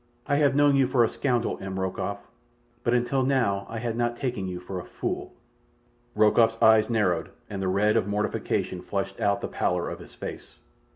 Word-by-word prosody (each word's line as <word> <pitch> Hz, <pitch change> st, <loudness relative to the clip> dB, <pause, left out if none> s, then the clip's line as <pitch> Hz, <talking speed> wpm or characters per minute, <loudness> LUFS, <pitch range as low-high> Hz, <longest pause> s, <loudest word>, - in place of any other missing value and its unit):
I 145 Hz, -1 st, +1 dB
have 145 Hz, -2 st, +3 dB
known 145 Hz, -1 st, +5 dB
you 135 Hz, -2 st, +4 dB
for 125 Hz, -2 st, +3 dB
a -, -, +4 dB
scoundrel, 120 Hz, 0 st, -1 dB
M. 95 Hz, 0 st, -4 dB
Rokoff; 95 Hz, -1 st, -3 dB, 0.6 s
but 120 Hz, -, +2 dB
until 125 Hz, +2 st, +1 dB
now 125 Hz, -7 st, +1 dB
I 115 Hz, -, -5 dB
had 115 Hz, 0 st, -2 dB
not 120 Hz, 0 st, -1 dB
taken 120 Hz, -8 st, -2 dB
you 90 Hz, -1 st, -4 dB
for 90 Hz, +1 st, -6 dB
a -, -, -7 dB
fool." -, -, -4 dB, 0.8 s
Rokoff's 110 Hz, +1 st, +4 dB
eyes 110 Hz, 0 st, +5 dB
narrowed, 105 Hz, -7 st, +1 dB, 0.2 s
and 100 Hz, -1 st, -4 dB
the 95 Hz, -, -1 dB
red 100 Hz, +3 st, +2 dB
of -, -, +2 dB
mortification 100 Hz, -3 st, -1 dB
flushed 95 Hz, +1 st, -4 dB
out 100 Hz, 0 st, +1 dB
the -, -, -2 dB
pallor 90 Hz, -1 st, -1 dB
of -, -, -7 dB
his -, -, -13 dB
face. -, -, -8 dB
110 Hz, 190 wpm, -26 LUFS, 95-120 Hz, 0.8 s, known